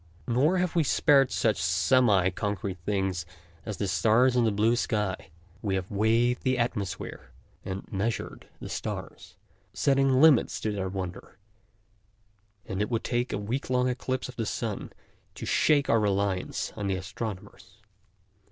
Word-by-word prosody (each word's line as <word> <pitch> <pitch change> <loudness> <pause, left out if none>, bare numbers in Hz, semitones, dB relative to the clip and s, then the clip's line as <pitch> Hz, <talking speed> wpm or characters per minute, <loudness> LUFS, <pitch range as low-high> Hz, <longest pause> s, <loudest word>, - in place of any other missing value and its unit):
Nor 140 +10 +2
have 180 -1 -1
we 165 - +4
spared 140 -2 +4
such - - 0
semi 105 -8 +3
concrete 100 -1 -3
things 95 -4 0 0.4
as 105 -3 -4
the 100 - -2
stars 115 +6 +3
and 120 -2 +3
the - - +2
blue 110 +4 +2
sky. 105 -5 -2 0.3
We 100 -3 -1
have 95 0 -4
weighed 115 +4 +2
the 130 -1 +1
atmosphere 120 -5 -3 0.3
and 95 +1 -5
measured 105 +4 -3
the - - -7
stars, - - -6 0.4
setting 135 -1 +3
limits 150 -4 +5
to 110 - -1
their 95 -2 -3
wonder, 95 -1 -6 1.3
and 95 +1 -3
it 105 - -1
would 115 -2 -1
take 120 0 -1
a - - -1
week 115 +7 -3
long 125 0 +2
eclipse 130 +1 -2
of 125 - -11
the 115 -2 -2
sun 110 -4 -4 0.4
to - - -6
shake 145 -2 +3
our 115 - +4
reliance 100 -2 -1
on 100 - -3
the 95 - 0
astronomers. 95 +3 -7
110 Hz, 150 wpm, -28 LUFS, 100-125 Hz, 1.3 s, limits